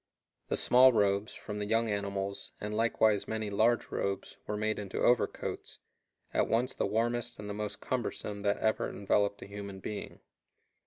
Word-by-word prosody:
The - - 0
small 130 +1 +7
robes, 100 -2 +1
from 105 0 -6
the 105 - -2
young 115 +1 +2
animals, 100 -1 -3
and 105 +1 -3
likewise 110 -2 +2
many 110 -2 -2
large 110 +4 +2
robes, 100 0 -2
were 105 - -2
made 110 0 0
into 100 -2 -5
overcoats, 120 -1 0 0.6
at - - +2
once 120 +3 +1
the - - -1
warmest 120 +3 0
and 105 - -7
the 105 - -3
most 105 0 -4
cumbersome 105 -4 -3
that 100 0 +1
ever 110 0 +1
enveloped 100 0 0
a - - -8
human 100 -1 -7
being. 105 +2 -6
105 Hz, 165 wpm, -31 LUFS, 100-115 Hz, 0.6 s, small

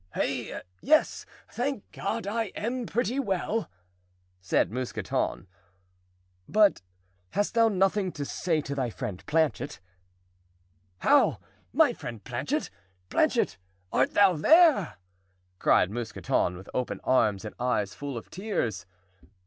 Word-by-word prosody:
"Hey, - - -2 0.2
yes, 310 +3 +2 0.2
thank 250 -2 -2
God, 230 -1 -3
I 225 +3 -1
am 235 +2 -3
pretty 240 +3 0
well," 210 -1 -1 0.7
said 95 - +1
Mousqueton. 125 -7 -2 1.0
"But 210 - +4 0.5
hast 205 - 0
thou 230 -1 +5
nothing 195 -1 +1
to 145 - -4
say 160 +1 -1
to 140 - -5
thy 130 -3 -1
friend 110 -5 -6
Planchet?" 150 - 0 1.2
"How, - - +4 0.3
my - - +4
friend 115 -4 -8
Planchet? - - -2 0.4
Planchet—art 95 +6 0
thou 200 -2 +6
there?" 310 - +5 0.6
cried 95 - +4
Mousqueton, 110 -5 -1
with 95 - -12
open 125 - -2
arms 110 -5 +2
and 105 - -6
eyes 115 -5 0
full 140 -3 -5
of 115 - -9
tears. 120 - -3
155 Hz, 115 wpm, -28 LUFS, -, 1.2 s, thou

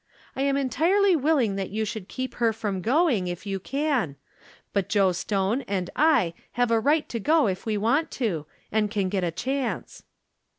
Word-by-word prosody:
I 265 - -2
am 275 0 +2
entirely 340 - +3
willing 270 -9 +2
that 195 -1 -3
you 220 +2 -2
should 210 -3 -5
keep 255 +3 -5
her 230 -1 +3
from 205 -4 -3
going, 250 - +2
if 175 +3 -5
you 195 -1 -2
can; 270 - -1 0.6
but 200 -3 0
Joe 195 -3 +3
Stone 195 +6 0
and 185 -3 -2
I 290 - +3 0.2
have 245 -1 +1
a 230 - +4
right 295 +6 +2
to 230 - -3
go 310 +6 +3
if 190 +1 -2
we 215 -1 0
want 255 +10 +1
to, 175 - -2 0.2
and 215 -1 +1
can 200 -3 -1
get 190 -1 -1
a 175 - +1
chance." 260 +8 -3
225 Hz, 185 wpm, -26 LUFS, 195-275 Hz, 0.6 s, a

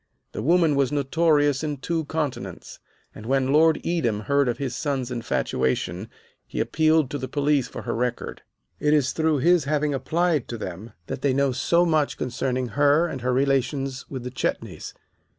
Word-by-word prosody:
The - - -5
woman 165 +2 +3
was 140 -2 +1
notorious 145 0 +2
in 150 -2 -2
two 160 +4 -2
continents, 135 - -4 0.3
and 110 - -10
when 135 +1 +1
Lord 160 +1 +5
Edam 125 -12 0
heard 140 +3 +2
of 120 - -2
his 130 -3 -3
son's 130 -3 -2
infatuation 95 - -1 0.4
he - - -5
appealed 155 -3 +2
to 145 - -3
the 130 - -4
police 145 -1 +1
for - - -8
her 120 - -2
record. 120 +1 -3 0.4
"It 150 0 +3
is 140 -4 +2
through 160 -1 +1
his 170 +2 +3
having 150 0 0
applied 155 +1 0
to 120 - -5
them 105 +1 -7
that - - -5
they 140 -2 +2
know 140 0 +2
so 170 +8 +2
much 155 -4 +1
concerning 125 0 -2
her 145 +4 +3
and 135 -7 -5
her 125 +1 0
relations 135 0 0
with 130 -3 -6
the 125 - -5
Chetneys. 130 - -4
140 Hz, 175 wpm, -24 LUFS, 125-150 Hz, 0.4 s, Lord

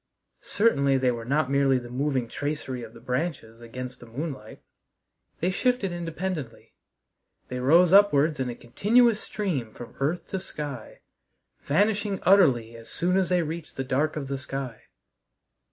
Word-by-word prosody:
Certainly 140 -11 +3
they 130 -1 +2
were 115 -1 -5
not 140 +1 +1
merely 140 -1 +3
the 120 -1 -7
moving 130 -1 -1
tracery 145 -2 -4
of 115 -1 -9
the - - -11
branches 125 -2 -3
against 125 +2 -7
the 120 - -13
moonlight. 140 +4 -7 0.8
They 180 +3 +1
shifted 245 -2 0
independently. 170 -6 -5 0.8
They 125 - -4
rose 165 +7 +5
upwards 155 -7 +5
in 130 -1 -1
a 120 - -5
continuous 215 - +3
stream 155 - -3
from 120 - -10
earth 155 +6 -1
to 190 - -2
sky, 145 - -7 0.6
vanishing 200 +4 +1
utterly 130 - +4
as 115 0 -12
soon 180 +1 0
as 190 -2 +2
they 180 -1 +2
reached 160 +1 -6
the 135 - -1
dark 140 +4 0
of 145 -3 -4
the 135 0 -3
sky. 130 -3 -6
140 Hz, 155 wpm, -26 LUFS, 125-180 Hz, 0.8 s, rose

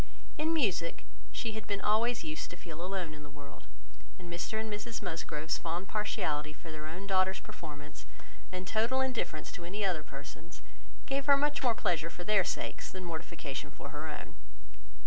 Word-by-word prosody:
In 315 +1 +3
music 200 - +2 0.3
she 230 - 0
had 220 0 -5
been 200 -1 +1
always 225 +3 +4
used 155 -1 -2
to 175 - -7
feel 165 -1 -6
alone 180 -4 -1
in 150 - -8
the 145 - -9
world; 145 0 -11 0.5
and 175 -2 -7
Mr 220 +5 0
and 220 - 0
Mrs 220 +3 -3
Musgrove's 160 -1 0
fond 170 +3 -1
partiality 155 -8 +1
for 160 +1 -9
their 155 0 -4
own 180 +5 -4
daughters' 190 -1 +4
performance, 150 -2 -8 0.4
and 185 0 -3
total 230 +6 +3
indifference 250 -12 0
to 175 - -6
any 200 +4 0
other 175 -5 +3
person's, 150 +3 -9 0.4
gave 275 0 +1
her 280 -1 +9
much 295 +1 +3
more 245 -4 +5
pleasure 165 -6 +2
for 175 - -6
their 205 0 +6
sakes, - - -1
than 185 -1 -5
mortification 160 -4 -3
for 140 0 -7
her 150 +2 -3
own. 155 - -5
175 Hz, 180 wpm, -34 LUFS, 155-215 Hz, 0.5 s, her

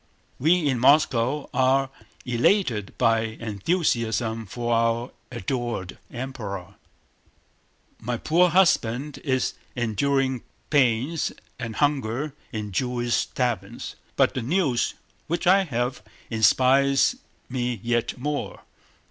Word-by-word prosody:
We 160 +3 +3
in 130 -4 +1
Moscow 140 0 +3
are 130 +1 +2 0.3
elated 120 - +1
by 115 -2 +3 0.2
enthusiasm 115 - -1
for 120 +2 -2
our 115 +1 +1 0.2
adored 120 -6 -3
Emperor. 115 -8 -6 1.3
"My 120 +1 -3
poor 175 +8 +3
husband 150 -6 +2
is 130 -3 0 0.2
enduring 130 +2 0 0.3
pains 135 +2 +2 0.3
and 115 -3 -5
hunger 140 -1 0 0.2
in 105 -3 -4
Jewish 120 +4 0
taverns, 115 -4 -3 0.2
but - - +3
the 130 - -2
news 135 -2 +1 0.3
which 170 +2 -2
I 190 +2 +5
have 125 -2 -2 0.3
inspires 135 - +4 0.3
me 125 -3 -2
yet 120 +1 0
more. 145 +3 -3
125 Hz, 100 wpm, -25 LUFS, 115-140 Hz, 1.3 s, I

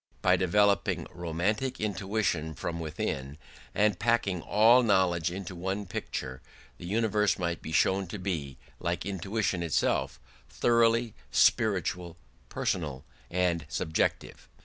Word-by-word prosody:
By - - +5
developing 100 +1 +2
romantic 95 +10 -2
intuition 95 -6 -1
from 85 +2 -4
within 75 -3 -4 0.4
and 105 -2 +2
packing 115 -6 +1
all 115 +7 +5
knowledge 95 -6 +2
into 90 0 -6
one 95 +4 -3
picture, 65 -7 -5 0.4
the 85 - -7
universe 105 -1 +1
might 85 -2 -2
be 80 - -7
shown 95 +4 +2
to 95 - -6
be, 80 -9 -4 0.2
like 85 -1 -2
intuition 95 0 -1
itself, 85 -3 0 0.3
thoroughly 115 -1 +2 0.2
spiritual, 90 - +2 0.3
personal, 75 -7 -2 0.2
and 90 -2 0
subjective. 80 +5 -2
90 Hz, 115 wpm, -29 LUFS, 85-105 Hz, 0.4 s, By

